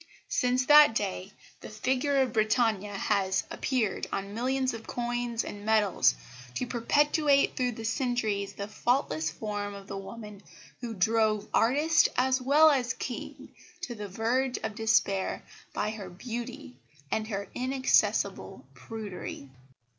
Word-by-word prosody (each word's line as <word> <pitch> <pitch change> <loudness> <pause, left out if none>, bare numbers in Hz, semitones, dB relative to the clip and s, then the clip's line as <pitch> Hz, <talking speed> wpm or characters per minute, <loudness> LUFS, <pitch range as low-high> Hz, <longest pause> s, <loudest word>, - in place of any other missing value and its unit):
Since 250 0 +1
that 295 -5 +8
day 195 -2 -2 0.3
the - - -10
figure 265 +5 +1
of 250 -3 -4
Britannia 215 -2 +1
has 195 -2 +1
appeared 230 -8 -1
on 195 +1 -4
millions 260 +3 0
of 225 -1 -8
coins 240 -1 -2
and 205 0 -8
medals 210 - +3 0.4
to - - -1
perpetuate 285 +4 +2
through 250 -1 0
the 225 - -8
centuries 220 -4 -1
the 200 +1 -6
faultless 215 - 0
form 205 +3 -4
of 200 -1 -10
the 195 0 -6
woman 210 0 -9 0.4
who 230 -2 -5
drove 215 +1 +1
artist 290 +8 +4
as 260 +1 +2
well 300 +4 +6
as 255 -4 0
King 250 - -6 0.3
to 265 -9 -4
the 210 -3 -6
verge 245 +6 0
of 220 - -3
despair 210 -3 +1 0.3
by 210 +1 -2
her 205 -4 -7
beauty 240 +6 -7 0.3
and 215 0 -1
her 200 -2 -4
inaccessible 260 +1 0
prudery. 210 -10 -7
225 Hz, 135 wpm, -29 LUFS, 205-255 Hz, 0.4 s, that